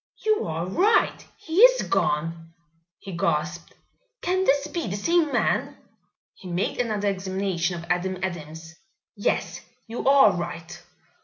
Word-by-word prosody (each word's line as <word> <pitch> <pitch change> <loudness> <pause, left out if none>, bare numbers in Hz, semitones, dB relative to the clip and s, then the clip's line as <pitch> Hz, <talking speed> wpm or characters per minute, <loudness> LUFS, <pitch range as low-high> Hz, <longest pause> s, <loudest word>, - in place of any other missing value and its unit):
"You 435 -1 +2
are 165 +1 -3
right, 380 - +2
he 325 +1 -6
is - - +7
gone!" 165 +2 -1 0.4
he 190 -3 -8
gasped. 170 +1 -2 0.5
"Can 370 +2 +1
this 280 -2 +3
be 340 -7 -4
the 195 - -3
same 325 +8 +1
man?" - - 0 0.6
He 190 - -13
made 180 +7 -2
another 215 -4 -1
examination 190 -2 -2
of 170 - -8
Adam 180 +2 -1
Adams. 160 -2 -6 0.4
"Yes, 205 - -1 0.2
you 230 +1 -5
are 275 -6 +7
right. 170 0 -6
190 Hz, 135 wpm, -25 LUFS, 170-275 Hz, 0.6 s, is